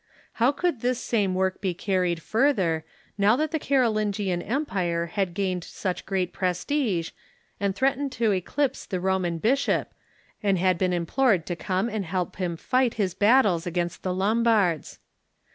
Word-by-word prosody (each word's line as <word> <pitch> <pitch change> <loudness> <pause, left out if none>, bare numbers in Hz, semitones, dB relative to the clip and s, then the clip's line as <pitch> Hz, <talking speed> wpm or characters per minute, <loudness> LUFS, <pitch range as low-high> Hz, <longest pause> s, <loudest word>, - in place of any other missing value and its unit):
How 245 +4 +5
could 310 -4 -1
this 250 0 0
same 205 -7 0
work 190 0 0
be 185 -3 -1
carried 180 -3 0
further, 195 - +1 0.4
now 205 +3 +5
that 305 +3 -1
the 320 - 0
Carolingian 215 -9 +1
empire 185 - -1
had 195 -4 -1
gained 185 -3 -1
such 185 +1 -4
great 190 -2 -1
prestige 185 - -1 0.5
and 200 -1 0
threatened 270 +2 0
to 225 -2 +1
eclipse 265 +9 -1
the 185 - -2
Roman 185 -2 0
bishop, 255 - +1 0.5
and 195 -2 +2
had 180 -1 +2
been 185 -1 +1
implored 180 +2 +1
to 175 - -3
come 185 +4 -1
and 215 -3 -2
help 180 0 -3
him 175 -3 -2
fight 255 +5 +1
his 195 -5 0
battles 205 -6 +3
against 175 0 -2
the 185 - -2
Lombards 205 -3 +1
195 Hz, 155 wpm, -26 LUFS, 180-235 Hz, 0.5 s, How